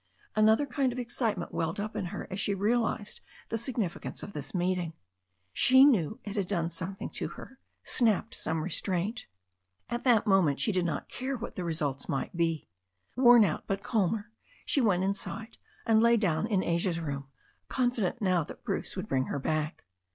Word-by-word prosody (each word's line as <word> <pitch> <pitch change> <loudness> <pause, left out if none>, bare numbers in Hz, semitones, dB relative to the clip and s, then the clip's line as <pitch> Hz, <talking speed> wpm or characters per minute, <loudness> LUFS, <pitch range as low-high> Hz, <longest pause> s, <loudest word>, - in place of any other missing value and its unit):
Another 220 +6 +5
kind 265 -1 0
of 245 - -6
excitement 230 -6 -2
welled 165 +3 -1
up 215 +1 -4
in - - -2
her 175 - -5
as 190 - -3
she 200 - +1
realized 210 0 0 0.3
the 225 - -1
sig 245 +2 -4
nificance 190 -8 -3
of 200 - -7
this 145 -2 -4
meeting. 180 -2 0 0.6
She 260 - +7
knew 220 - +3
it 205 0 -6
had 195 -3 0
done 170 -4 -1
something 185 +3 -5
to - - -3
her, - - -11 0.2
snapped 225 -2 +2
some 160 -1 -1
restraint. 190 +5 -1 0.6
At 240 0 -1
that 240 -5 +4
moment 185 -8 +3
she 215 - +2
did 180 -2 +1
not 165 - -2
care 260 +1 -3
what 235 - -6
the 180 - -3
results 150 -5 -2
might 135 +5 -2
be. 165 -3 0 0.5
Worn 240 -3 +7
out, 165 - -2
but 195 0 -2
calmer, 215 0 0 0.3
she 280 - +2
went 190 -6 +3
inside 205 +3 -3 0.3
and 220 -1 +4
lay 235 0 +5
down 195 -2 +1
in 200 -5 +1
Asia's 170 0 0
room, 140 -4 -4 0.4
confident 245 -3 0
now 185 -3 +3
that - - -11
Bruce - - -3
would - - -4
bring 130 -1 +1
her - - -3
back. 155 +2 -2
195 Hz, 180 wpm, -30 LUFS, 170-230 Hz, 0.6 s, She